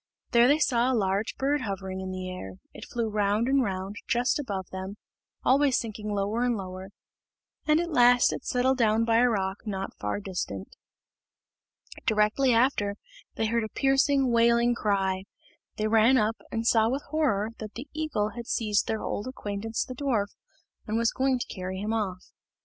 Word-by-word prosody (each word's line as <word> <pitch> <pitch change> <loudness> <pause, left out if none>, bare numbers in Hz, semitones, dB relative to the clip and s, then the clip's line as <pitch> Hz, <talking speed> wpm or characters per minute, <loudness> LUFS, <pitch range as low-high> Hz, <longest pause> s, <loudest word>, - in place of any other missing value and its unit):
There 235 0 +6
they 290 +3 +5
saw 250 -4 +2
a 250 - +2
large 195 +1 0
bird 285 +1 +1
hovering 190 -4 -4
in 190 - -5
the 185 0 -5
air; 180 - -7 0.2
it - - -9
flew 235 -2 -1
round 210 +2 +1
and 275 +1 +3
round 195 -2 -3
just 245 +5 +1
above 195 -9 -4
them, 190 +2 -6 0.5
always 270 0 +4
sinking 215 -2 -4
lower 205 +3 -1
and 245 -2 +1
lower, 185 0 -7 0.8
and 305 +1 +4
at 345 0 -2
last 245 -3 +5
it - - -6
settled 260 +1 +1
down 225 0 +3
by 230 0 +3
a 245 +1 +5
rock 195 -3 -1
not 195 -2 -4
far 105 - -2
distant. 180 - -5 1.3
Directly 220 +5 +3
after, 230 -4 +2 0.4
they 225 - 0
heard 230 +1 +1
a 215 - -4
piercing, 270 0 +2
wailing 235 +1 +4
cry. 195 -4 0 0.5
They 215 - 0
ran 225 +4 +5
up, 220 0 +1
and 225 0 -2
saw 225 -1 +4
with 270 +3 -2
horror 255 -10 +1
that 215 -1 -7
the 250 +5 -7
eagle 300 -9 -1
had 235 +2 -8
seized 210 -3 +1
their 220 -1 -2
old 205 - -3
acquaintance 220 -3 -3
the 255 - -7
dwarf, 240 -7 -1 0.5
and 220 +1 0
was 230 0 +2
going 265 0 +1
to 245 - -4
carry 185 0 -5
him 210 +3 -2
off. 190 -5 -2
225 Hz, 180 wpm, -27 LUFS, 200-250 Hz, 1.3 s, There